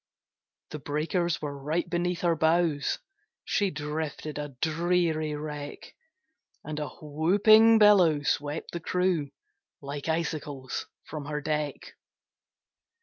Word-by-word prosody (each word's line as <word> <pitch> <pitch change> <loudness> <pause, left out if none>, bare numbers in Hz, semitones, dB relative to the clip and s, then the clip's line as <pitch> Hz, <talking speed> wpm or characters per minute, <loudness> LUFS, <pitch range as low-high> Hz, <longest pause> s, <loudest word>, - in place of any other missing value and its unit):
The 150 - -5
breakers 160 +4 -1
were 145 -1 -3
right 155 +6 -2
beneath 175 0 -1
her 170 -2 +2
bows, 160 -2 +2 0.5
She 200 -1 +1
drifted 150 -1 -4
a 145 -3 -6
dreary 160 -1 +1
wreck, 150 -1 -7 0.7
And 150 0 -5
a 150 - -3
whooping 205 +9 +5
billow 185 -9 +5
swept 145 +2 -2
the 170 - -4
crew 180 -4 0 0.5
Like 140 +2 -6
icicles 150 -5 -3 0.2
from 150 -2 -7
her 150 0 -3
deck. 150 -1 -3
155 Hz, 110 wpm, -28 LUFS, 150-175 Hz, 0.7 s, whooping